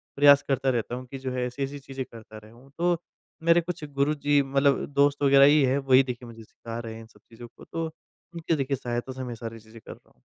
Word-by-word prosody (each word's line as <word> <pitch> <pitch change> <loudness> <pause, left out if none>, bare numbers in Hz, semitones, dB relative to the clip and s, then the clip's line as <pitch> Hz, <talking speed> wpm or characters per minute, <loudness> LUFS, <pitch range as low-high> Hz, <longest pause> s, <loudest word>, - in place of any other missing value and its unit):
प्रयास 145 0 +7
करता 135 -1 +1
रहता 120 -1 -1
हूँ, 130 +1 -7
कि 135 - -8
जो 130 -1 -4
है 125 -1 -2
ऐसी-ऐसी 135 +3 -5
चीज़ें 135 -1 -6
करता 110 -1 -12
रहूँ, 120 +5 -18
तो 175 0 +2 0.5
मेरे 170 +1 +5
कुछ 170 -1 -6
गुरुजी 145 0 +2
मतलब 140 +1 +1
दोस्त 145 0 +2
वगैरह 140 0 +7
ही 150 +1 +5
है, 130 +1 +2
वही 135 -1 +4
देखिए 125 -1 -6
मुझे 115 -1 -12
सीखा 115 +1 -8
रहे 115 -1 -7
हैं 115 - -9
इन 110 - -13
सब - - -23
चीज़ों 120 +1 -11
को, - - -13
तो 165 0 -4 0.5
उनकी 165 -1 -1
देखिए 135 -1 -1
सहायता 120 +2 -4
से 130 0 -6
मैं 120 -2 -5
सारी 115 0 -8
चीज़ें 110 +1 -15
कर - - -9
रहा - - -23
हूँ। - - -35
135 Hz, 240 wpm, -26 LUFS, 120-140 Hz, 0.5 s, प्रयास